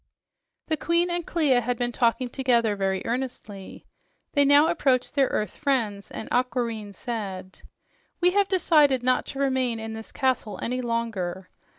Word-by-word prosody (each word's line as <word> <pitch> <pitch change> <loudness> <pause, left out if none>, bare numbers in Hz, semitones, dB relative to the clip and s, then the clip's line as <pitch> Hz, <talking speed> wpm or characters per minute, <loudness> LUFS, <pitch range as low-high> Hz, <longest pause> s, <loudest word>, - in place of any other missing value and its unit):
The 315 - -1
queen 340 +3 +1
and 345 0 -1
Clia 290 -7 +2
had 245 +1 -2
been 245 0 -1
talking 240 +1 +1
together 240 -4 +1
very 195 -1 -1
earnestly. 230 -5 -5 0.5
They 285 - +4
now 285 +2 +6
approached 280 -7 +1
their 275 -2 +3
earth 210 -4 -2
friends, 225 -8 -1
and - - -7
Aquareine 235 -4 -1
said: 195 -5 -6 0.6
"We 360 0 +4
have 400 +1 +2
decided 300 -9 +3
not 255 0 +1
to 275 - -7
remain 260 -4 0
in 220 0 -6
this 220 0 -9
castle 250 -6 -1
any 250 +2 -2
longer. 215 -7 -3
245 Hz, 155 wpm, -25 LUFS, 220-275 Hz, 0.6 s, now